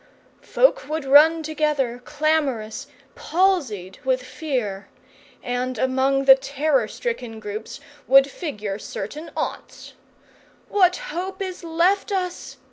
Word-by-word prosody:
Folk - - +2
would 310 -2 -3
run 310 +4 +6
together, 295 -6 -1
clamorous, 290 -8 -1 0.3
palsied 290 - 0
with 255 -1 0
fear; 245 -8 -4 0.6
and 250 0 -2
among 265 +2 +1
the 270 - +10
terror 270 -2 0
stricken 245 - -5
groups 215 +1 -7 0.3
would 270 +2 +7
figure 215 - -5
certain 290 +12 -7
aunts. - - -5 0.8
"What 365 -3 +4
hope 385 -6 -5
is 370 -2 -5
left 345 +6 +1
us?" 365 -2 -3
280 Hz, 110 wpm, -23 LUFS, 245-335 Hz, 0.8 s, the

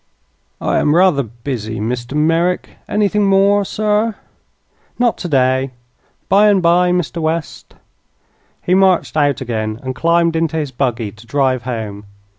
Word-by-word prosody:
"I - - 0
am 150 +1 +2
rather 180 -5 +4
busy, 115 -2 -6
Mr. 120 +4 -4
Merrick. 165 +4 +1 0.2
Anything 210 0 +1
more, 200 +1 +3
sir?" 210 +2 0 0.8
"Not 240 -1 +2
today. 130 -5 0 0.5
Bye 205 +2 +5
and 200 -2 +3
bye, 175 +1 +3
Mr. 175 -1 -1
West." 160 0 -4 0.9
He 180 - +1
marched 190 -4 +3
out 145 -4 +1
again 110 -3 -3
and 130 0 -3
climbed 170 +3 +1
into 160 -1 0
his 150 -4 -3
buggy 120 -4 -2
to 110 +2 -17
drive 130 -2 0
home. 110 -5 -5
155 Hz, 135 wpm, -17 LUFS, 125-180 Hz, 0.9 s, Bye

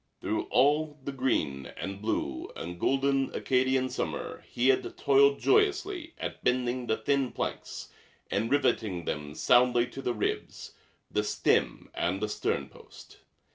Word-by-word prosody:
Through - - -2
all 150 +2 +2
the 140 - -3
green 80 - -1
and 100 0 -5
blue 70 -11 -2
and 85 +1 -6
golden 135 +2 +2
Acadian 130 0 +2
summer 125 - -4
he 125 +2 +2
had 130 - +1
toiled 140 0 +5
joyously 390 -5 +1
at - - -6
bending 125 0 0
the 110 - +1
thin 140 -3 0
planks - - -5 0.4
and 110 +3 0
riveting 110 -10 +1
them 75 0 -4
soundly 120 -1 +4
to 135 - -7
the 125 -2 -1
ribs, 105 - -3 0.4
the 105 - +1
stem - - 0
and 90 +3 -1
the 105 +1 -2
sternpost. - - -5
125 Hz, 135 wpm, -29 LUFS, 105-140 Hz, 0.4 s, toiled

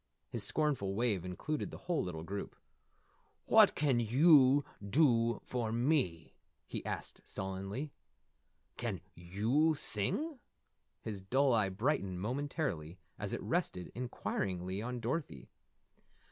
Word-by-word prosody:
His 115 - 0
scornful 125 -6 +1
wave 110 -5 +1
included 95 - -3
the - - -8
whole 175 -2 -1
little 80 -3 -4
group. 100 +4 -5 0.9
"What - - +6
can 140 -5 +2
yew 135 +3 +6 0.2
dew 115 -1 +3
for 120 -3 -2
me?" 120 - +1 0.3
he - - -5
asked - - -5
sullenly. 95 +9 -4 0.9
"Can 110 -8 -3
yew 110 - +1
sing?" 255 - -1 0.6
His 105 -3 -4
dull 130 +7 +2
eye 105 -4 +3
brightened 100 -3 -1
momentarily 120 - -2 0.2
as - - -3
it - - -3
rested 90 -1 -1
inquiringly 95 -6 -3
on 125 +1 -4
Dorothy. 115 - -3
115 Hz, 115 wpm, -34 LUFS, 95-140 Hz, 0.9 s, What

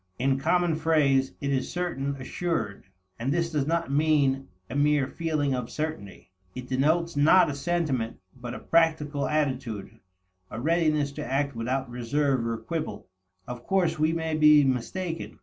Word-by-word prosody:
In 135 +1 +1
common 175 +3 +2
phrase, 150 -4 +2
it 140 -1 -1
is 135 -1 -1
certain, 140 -6 -2
assured. 140 - -3 0.3
And 125 +4 -1
this 165 +1 0
does 145 -3 0
not 165 -2 0
mean 140 -2 +2 0.2
a - - -7
mere 145 -1 +3
feeling 155 -3 -1
of 125 -2 -3
certainty. 150 -15 -6 0.2
It 125 0 -7
denotes 155 +6 +1
not 150 +3 +5
a - - -4
sentiment, 140 -6 -1 0.2
but 125 -1 -7
a - - -6
practical 155 -3 +1
attitude, 130 -8 -2 0.5
a 110 - -6
readiness 155 -1 +1
to - - -6
act 140 0 0
without 130 +4 -2
reserve 125 +1 0
or 115 -1 -2
quibble. 160 - -5 0.4
Of 125 -1 -8
course 185 -5 +1
we 155 +1 +3
may 160 -1 -2
be 150 -1 +6
mistaken. 160 +7 -2
145 Hz, 155 wpm, -27 LUFS, 130-160 Hz, 0.5 s, be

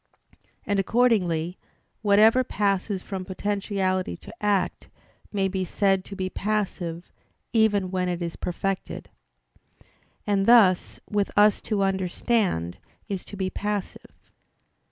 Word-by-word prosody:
And 205 -1 +1
accordingly, 185 -7 +1 0.4
whatever 220 +4 +5
passes 200 -3 -1
from 190 -2 -5
potentiality 190 - -2
to - - -12
act, 200 -3 0 0.4
may 195 -2 +1
be 190 0 -2
said 195 +1 +1
to 200 - -8
be 190 -1 -2
passive, 185 -4 -3 0.4
even 205 -5 +3
when 185 -1 0
it 175 -1 -2
is 170 -1 -4
perfected. 190 +2 -4 1.1
And 200 -1 +1
thus 215 -7 +5
with 205 -1 0
us 210 0 +5
to 205 -3 +1
understand 190 - 0 0.3
is 195 -3 -3
to 200 - -9
be 185 -1 -2
passive. 205 -1 -5
195 Hz, 115 wpm, -25 LUFS, 185-205 Hz, 1.1 s, whatever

